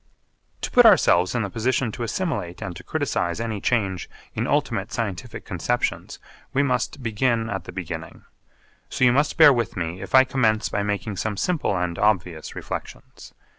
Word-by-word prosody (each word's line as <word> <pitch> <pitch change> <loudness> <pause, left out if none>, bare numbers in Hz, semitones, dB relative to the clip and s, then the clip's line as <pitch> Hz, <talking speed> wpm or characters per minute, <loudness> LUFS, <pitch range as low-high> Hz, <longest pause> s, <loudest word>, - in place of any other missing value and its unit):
To - - -4
put 245 - +7
ourselves 90 - +4
in 120 - +1
the 100 - -3
position 120 +1 0
to 120 - -8
assimilate 115 - -3
and 90 - -5
to - - -10
criticise 85 +3 -1
any 110 -3 -3
change 100 -7 0 0.2
in - - -2
ultimate - - 0
scientific - - -4
conceptions - - -2 0.4
we 140 - +3
must 130 0 -1
begin 115 0 0
at 95 -3 -4
the - - -8
beginning. 85 -3 -7 0.6
So - - -2
you 120 - +6
must 145 +4 +1
bear 145 - +9
with 120 -6 -2
me 85 +1 -3
if 100 - -2
I 130 - +9
commence 115 -5 +1
by 100 - -1
making 100 0 -3
some 105 0 -2
simple 155 - 0
and 90 -1 -2
obvious 90 -6 0
reflections. - - -8
110 Hz, 170 wpm, -24 LUFS, 90-125 Hz, 0.6 s, bear